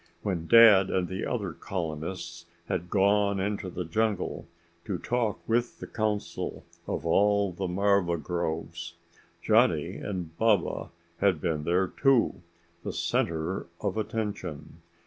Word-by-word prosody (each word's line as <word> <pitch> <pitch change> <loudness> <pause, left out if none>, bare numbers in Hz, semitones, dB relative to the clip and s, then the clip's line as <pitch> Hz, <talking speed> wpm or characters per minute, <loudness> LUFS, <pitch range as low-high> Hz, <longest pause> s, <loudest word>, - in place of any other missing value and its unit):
When 90 -5 -2
Dad 110 -5 +8
and 90 -1 0
the 95 +1 -4
other 100 -8 -2
colonists 85 0 -5 0.2
had 90 0 -2
gone 100 +1 +3
into 100 -1 -2
the 90 0 -4
jungle 105 +1 -1 0.4
to 95 - -2
talk 115 +1 -1
with 120 +1 0
the - - -6
council 110 -2 -3 0.2
of - - -3
all 100 +3 +3
the 95 +2 -3
marva 95 -1 +2
groves, 85 +1 -4 0.5
Johnny - - +3
and 90 -5 -5
Baba 110 -6 +2 0.3
had 95 -5 +3
been 75 -1 -2
there 90 +2 +2
too 135 -9 +2 0.4
the - - -4
center 85 +3 -1
of 100 -1 -2
attention. 100 -8 -4
95 Hz, 125 wpm, -28 LUFS, 85-105 Hz, 0.5 s, Dad